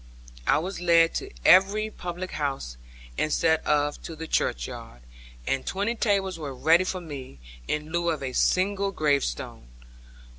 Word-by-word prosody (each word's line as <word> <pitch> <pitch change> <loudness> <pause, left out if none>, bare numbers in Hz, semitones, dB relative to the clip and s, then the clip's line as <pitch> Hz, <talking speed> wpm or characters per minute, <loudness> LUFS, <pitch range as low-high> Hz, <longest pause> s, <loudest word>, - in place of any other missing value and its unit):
I - - +5
was 180 +3 -4
led 165 -1 +4
to - - -4 0.2
every 205 +3 +5
public 180 0 -6
house, 135 - -3 0.4
instead 160 +1 +2
of 145 -1 +1
to 165 - -7
the 160 +1 -6
churchyard; - - -3 0.4
and 135 -1 -1
twenty 200 +4 -1
tables 195 -6 0
were 140 -4 -5
ready 165 +7 +4
for 185 0 -3
me, 140 - -8 0.3
in 150 +1 -3
lieu 170 0 0
of 155 -4 -2
a 130 -1 -4
single 195 +5 +1
gravestone. 140 - -1
165 Hz, 145 wpm, -26 LUFS, 145-185 Hz, 0.4 s, I